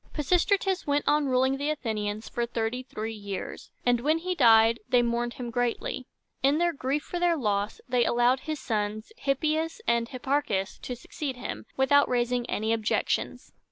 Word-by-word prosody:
Pisistratus 370 +5 +1
went 285 0 +1
on 295 -1 +3
ruling 260 +1 +2
the 285 +2 -1
Athenians 215 -7 -3
for 235 0 -2
thirty 235 +1 -2
three 225 -4 -5
years, 200 -3 -6 0.2
and 245 -1 +3
when 305 +6 +2
he 365 +2 -2
died 230 -6 +5
they 245 -1 +4
mourned 235 0 -1
him 240 -2 -5
greatly. 245 +1 -2 0.3
In 275 +3 +3
their 345 +1 +2
grief 280 +1 -1
for 350 - -4
their 345 -1 +3
loss, 205 -4 -1
they 250 -1 +2
allowed 240 +2 +3
his 310 +1 -4
sons, 215 -1 -2
Hip´ 275 -1 +1
pi 310 0 +2
as 325 +5 -6
and 235 0 +1
Hip 255 - -8
par´chus, 265 -9 -1
to 250 - -5
succeed 265 +2 -5
him, 250 - -6
without 285 +2 +4
raising 245 0 0
any 220 +2 0
objections. 220 -1 -1
250 Hz, 180 wpm, -27 LUFS, 230-290 Hz, 0.3 s, died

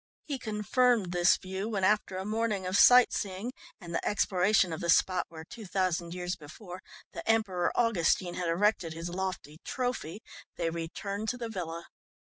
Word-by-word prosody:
He 280 -3 -4
confirmed 220 -1 +1
this 175 0 +4
view 190 +3 -5
when 200 -4 -2
after 200 -1 +2
a 190 - -4
morning 215 -2 -1
of 185 +1 -2
sight 250 +3 +7
seeing 200 +4 -3 0.3
and 170 -4 -9
the - - -1
exploration 190 -2 +2
of 160 - -5
the 170 - -3
spot 185 +2 +3
where, 160 -1 -9
two 215 +5 -10
thousand 180 -2 -1
years 180 0 -3
before, 175 +5 -10 0.3
the - - -5
Emperor 205 -6 +2
Augustine 185 -6 +2
had 175 -1 -2
erected 180 -1 +1
his 165 +2 -5
lofty 180 -5 -4
"trophy," 245 -7 -3 0.3
they 165 -1 -1
returned 200 +6 -4
to 250 - -2
the 235 -2 -5
villa. 170 -5 -5
190 Hz, 170 wpm, -30 LUFS, 175-215 Hz, 0.3 s, sight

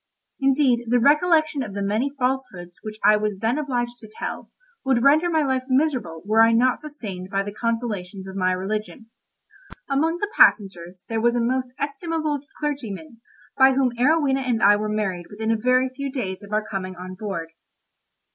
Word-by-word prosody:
Indeed, 270 -3 +2
the 245 +2 +3
recollection 310 +2 +3
of 210 -6 -6
the 200 - -3
many 215 +7 0
falsehoods 250 -10 -3
which 215 -1 -7
I 210 - +6
was 210 -2 -2
then 230 +8 0
obliged 245 -4 -2
to 220 - -13
tell, - - -6 0.3
would 260 -3 +2
render 310 +5 +5
my 320 -2 +2
life 260 -2 -1
miserable 255 - 0
were 215 +2 +4
I 225 0 +6
not 250 +2 +2
sustained 205 -12 -7
by 195 0 0
the 205 - -6
consolations 215 -5 -3
of 190 - -8
my 185 -1 +1
religion. 215 +5 -4 0.8
Among 315 +5 +1
the 415 +3 -3
passengers 185 -3 +3
there 225 -1 -2
was 240 +1 +2
a - - +1
most 250 +2 -1
estimable 300 +1 -2 0.2
clergyman, 275 -3 -5 0.4
by 265 0 +7
whom 260 -1 +2
Arowhena 275 +1 +2
and 245 -4 -1
I 205 +1 +7
were 210 +1 -2
married 195 -5 -2
within 220 +2 -2
a - - +3
very 255 +3 +2
few 275 0 -4
days 195 -9 -4
of 205 0 -13
our 215 0 -1
coming 185 -2 -5
on 185 +1 -8
board. 185 -4 -5
235 Hz, 180 wpm, -23 LUFS, 205-275 Hz, 0.8 s, by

